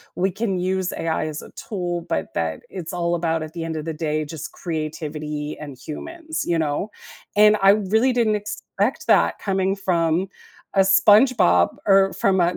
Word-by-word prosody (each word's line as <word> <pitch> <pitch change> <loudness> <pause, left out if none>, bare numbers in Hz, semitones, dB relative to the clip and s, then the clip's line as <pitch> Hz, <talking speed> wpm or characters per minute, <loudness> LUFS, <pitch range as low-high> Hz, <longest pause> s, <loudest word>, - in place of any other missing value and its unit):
we 190 +1 +1
can 200 -1 -2
use 185 0 -1
AI 160 -1 -2
as 155 -1 -5
a - - -13
tool, 175 -4 -4
but 80 - -2
that 80 -1 -2
it's 175 -3 -6
all 175 -1 0
about, 165 -1 -1
at 155 0 -9
the 170 -1 -4
end 165 0 -4
of 155 - -5
the 165 - -3
day, 155 0 -2
just 150 -1 -7
creativity 155 -2 -4
and 145 -3 -8
humans, 315 - -6
you 170 - +1
know, 155 +5 -1 0.5
and 210 0 +7
I 195 - +6
really 215 +5 +2
didn't 230 -3 +2
expect 210 +2 -3
that - - +4
coming 195 -1 0
from 175 -2 0 0.5
a 195 - +2
SpongeBob 205 +2 +5
or 195 -1 +4
from 190 -2 +2
a 175 +1 +2
175 Hz, 175 wpm, -22 LUFS, 155-195 Hz, 0.5 s, and